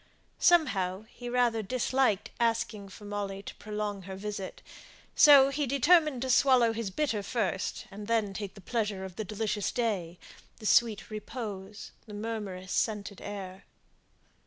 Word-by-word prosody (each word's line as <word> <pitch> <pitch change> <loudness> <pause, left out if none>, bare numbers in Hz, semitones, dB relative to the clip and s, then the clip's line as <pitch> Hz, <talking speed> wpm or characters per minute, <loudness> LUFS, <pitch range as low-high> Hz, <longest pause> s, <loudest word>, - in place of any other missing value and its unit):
Somehow, 200 - +3
he 245 0 -8
rather 240 -2 +2
disliked 255 0 +1
asking 230 -3 0
for 205 +2 -12
Molly 200 -1 -4
to - - -7
prolong 210 -1 -4
her 190 +1 -7
visit; 200 -1 -6 0.5
so 280 -3 +8
he 280 +1 -1
determined 280 0 +4
to 260 - -3
swallow 250 -3 +5
his 225 -3 -3
bitter 225 0 -1
first, 200 -2 -2
and 205 +1 -8
then 220 -4 +1
take 200 -1 -6
the 200 - -12
pleasure 205 -2 -2
of 185 -2 -9
the 220 - -3
delicious 210 0 -2
day, 195 -8 -2 0.4
the 215 - -11
sweet 220 0 +3
repose, 210 -2 -6 0.2
the 210 - -8
murmurous, 205 -4 -5
scented 210 -3 -1
air. 195 -2 -7
210 Hz, 145 wpm, -30 LUFS, 195-240 Hz, 0.5 s, so